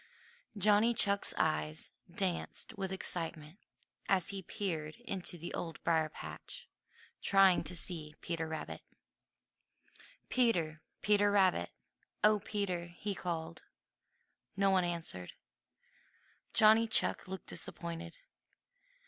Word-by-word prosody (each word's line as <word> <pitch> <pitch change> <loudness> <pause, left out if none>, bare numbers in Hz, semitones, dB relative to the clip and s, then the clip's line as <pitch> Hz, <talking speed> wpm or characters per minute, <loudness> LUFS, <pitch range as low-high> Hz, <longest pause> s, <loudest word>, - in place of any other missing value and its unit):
Johnny 210 +4 +4
Chuck's 200 -1 +3
eyes 155 0 0 0.2
danced 190 +4 -1
with 190 -2 -3
excitement 165 -2 -3 0.5
as 185 -3 +3
he 195 -1 -3
peered 165 -6 -3
into 185 -6 -3
the 170 +1 -7
Old 165 -2 -4
Briar 160 -2 +2
patch, - - -8 0.5
trying 195 -2 +5
to 180 - -4
see 160 -3 -4
Peter 165 -1 -3
Rabbit. 160 0 -5 1.5
"Peter! 170 -11 +2 0.2
Peter 205 0 +4
Rabbit! 190 - +3 0.5
Oh, 210 0 +6
Peter!" 190 -4 -2
he 185 +4 -4
called. 170 -3 -4 1.0
No 195 0 +4
one 185 -1 +4
answered. 165 - -4 1.2
Johnny 220 +1 +6
Chuck 225 - +2
looked 190 -1 -6
disappointed. 170 0 -5
180 Hz, 105 wpm, -34 LUFS, 165-200 Hz, 1.5 s, Oh